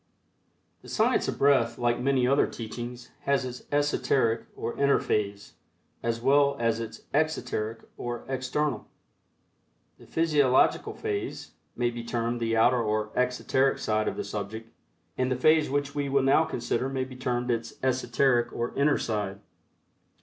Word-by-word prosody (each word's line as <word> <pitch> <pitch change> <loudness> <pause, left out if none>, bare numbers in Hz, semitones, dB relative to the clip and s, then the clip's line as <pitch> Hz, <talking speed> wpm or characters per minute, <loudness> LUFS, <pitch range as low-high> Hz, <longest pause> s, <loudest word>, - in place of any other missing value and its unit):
The - - -13
Science - - +2
of - - -2
Breath, 135 -5 +3
like 120 -1 +1
many 130 0 +2
other 135 +3 +3
teachings, 120 +2 -7
has 140 -2 +2
its 125 0 -7
esoteric 140 -5 +1
or 115 - -4
inner 140 0 +3
phase, 100 -1 -2 0.5
as 115 0 -1
well 140 +3 +3
as 115 -1 +1
its 115 -1 -7
exoteric 140 -7 -1 0.2
or 120 -1 -4
external. 135 +2 -2 1.1
The - - -16
physiological 150 -6 +2
phase 420 -2 -4 0.2
may 120 -1 0
be 120 0 -6
termed 120 0 -2
the 115 -1 0
outer 120 +2 +4
or 105 -1 -1
exoteric 125 +2 +1
side 110 0 0
of - - -2
the - - -2
subject, 110 +2 -6 0.5
and 130 0 +1
the - - +2
phase 155 +4 +4
which 140 0 -1
we 145 -1 -2
will 140 0 +2
now 140 +4 +4
consider 120 0 -2
may 135 -1 -1
be 130 0 -9
termed 125 -1 -1
its 115 -1 -3
esoteric 125 -1 +2
or 120 +1 -3
inner 145 +1 +3
side. 105 -3 -3
125 Hz, 150 wpm, -27 LUFS, 115-140 Hz, 1.1 s, outer